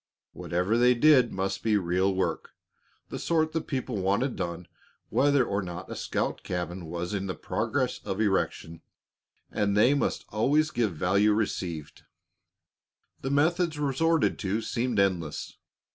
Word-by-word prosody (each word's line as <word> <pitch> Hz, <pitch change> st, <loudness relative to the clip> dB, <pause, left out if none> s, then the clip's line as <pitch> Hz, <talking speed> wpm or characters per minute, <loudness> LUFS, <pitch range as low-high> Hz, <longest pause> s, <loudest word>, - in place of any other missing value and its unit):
Whatever 90 Hz, +7 st, -1 dB
they 125 Hz, +1 st, +5 dB
did 130 Hz, -2 st, +5 dB
must 95 Hz, +1 st, -2 dB
be 110 Hz, -2 st, +2 dB
real 95 Hz, +1 st, +1 dB
work, 95 Hz, 0 st, -2 dB, 0.6 s
the -, -, -5 dB
sort 160 Hz, -1 st, +1 dB
that 160 Hz, 0 st, -3 dB
people 130 Hz, -5 st, -3 dB
wanted 100 Hz, +8 st, 0 dB
done 85 Hz, -1 st, -4 dB, 0.4 s
whether 140 Hz, -2 st, +3 dB
or 100 Hz, +1 st, -1 dB
not 90 Hz, 0 st, -7 dB
a -, -, -4 dB
scout -, -, -2 dB
cabin 90 Hz, 0 st, -4 dB
was 85 Hz, +3 st, -4 dB
in 100 Hz, -1 st, -2 dB
process -, -, -2 dB
of 95 Hz, -, -4 dB
erection; 95 Hz, -5 st, -1 dB, 0.7 s
and 100 Hz, -1 st, 0 dB
they 120 Hz, +6 st, +5 dB
must 145 Hz, -, -1 dB
always 145 Hz, +8 st, +2 dB
give 110 Hz, -8 st, 0 dB
value 100 Hz, +6 st, +3 dB
received. 90 Hz, -8 st, -3 dB, 1.2 s
The 135 Hz, -, -3 dB
methods 160 Hz, +3 st, +2 dB
resorted 150 Hz, +3 st, +1 dB
to 105 Hz, +3 st, -1 dB
seemed 120 Hz, -1 st, -1 dB
endless. 90 Hz, -6 st, -1 dB
105 Hz, 140 wpm, -27 LUFS, 95-135 Hz, 1.2 s, they